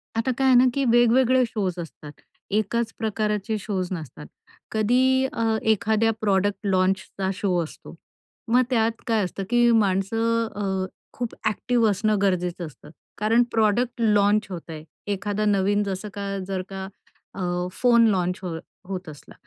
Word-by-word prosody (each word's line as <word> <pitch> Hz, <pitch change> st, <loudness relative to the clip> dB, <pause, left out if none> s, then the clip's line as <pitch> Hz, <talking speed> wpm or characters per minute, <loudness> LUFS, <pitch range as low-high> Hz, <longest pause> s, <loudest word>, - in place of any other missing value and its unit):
आता 230 Hz, +3 st, +1 dB
काय 270 Hz, -, +2 dB
आहे 255 Hz, -, +6 dB
ना, 255 Hz, -, +6 dB
की 275 Hz, -, 0 dB
वेगवेगळे 240 Hz, +2 st, +4 dB
शोज् 190 Hz, -6 st, -3 dB
असतात. 150 Hz, -2 st, -10 dB, 0.4 s
एकाच 220 Hz, +3 st, 0 dB
प्रकारचे 215 Hz, -1 st, -1 dB
शोज् 190 Hz, -3 st, -3 dB
नसतात. 155 Hz, -3 st, -8 dB, 0.5 s
कधी 255 Hz, +4 st, +3 dB
अ, 225 Hz, -1 st, +1 dB
एखाद्या 220 Hz, +1 st, +2 dB
प्रॉडक्ट 200 Hz, 0 st, +1 dB
लॉन्चचा 190 Hz, 0 st, 0 dB
शो 185 Hz, -2 st, 0 dB
असतो. 155 Hz, -, -11 dB, 0.5 s
मग 245 Hz, +2 st, +4 dB
त्यात 225 Hz, -2 st, +1 dB
काय 220 Hz, -3 st, +2 dB
असतं 195 Hz, +2 st, -4 dB
की 240 Hz, 0 st, +4 dB
माणसं 225 Hz, +3 st, +1 dB
अ, 190 Hz, -2 st, -1 dB, 0.3 s
खूप 240 Hz, -1 st, -4 dB
ॲक्टिव 230 Hz, +2 st, +1 dB
असणं 210 Hz, +1 st, +1 dB
गरजेचं 180 Hz, -2 st, 0 dB
असतं. 150 Hz, 0 st, -13 dB, 0.3 s
कारण 225 Hz, +3 st, +3 dB
प्रॉडक्ट 230 Hz, +3 st, +1 dB
लॉन्च 210 Hz, -1 st, +3 dB
होत 175 Hz, -2 st, -8 dB
आहे. 155 Hz, -1 st, -7 dB, 0.3 s
एखादा 205 Hz, +1 st, -2 dB
नवीन 205 Hz, 0 st, +2 dB
जसं 200 Hz, +1 st, -4 dB
का 200 Hz, -1 st, -4 dB
जर 190 Hz, -1 st, -2 dB
का 190 Hz, 0 st, -6 dB, 0.5 s
अ, 180 Hz, -1 st, -1 dB
फोन 235 Hz, +1 st, +4 dB
लॉन्च 180 Hz, -2 st, 0 dB
हो 170 Hz, -3 st, -4 dB, 0.3 s
होत 185 Hz, -3 st, -5 dB
असला 145 Hz, -, -13 dB
210 Hz, 150 wpm, -24 LUFS, 190-230 Hz, 0.5 s, आहे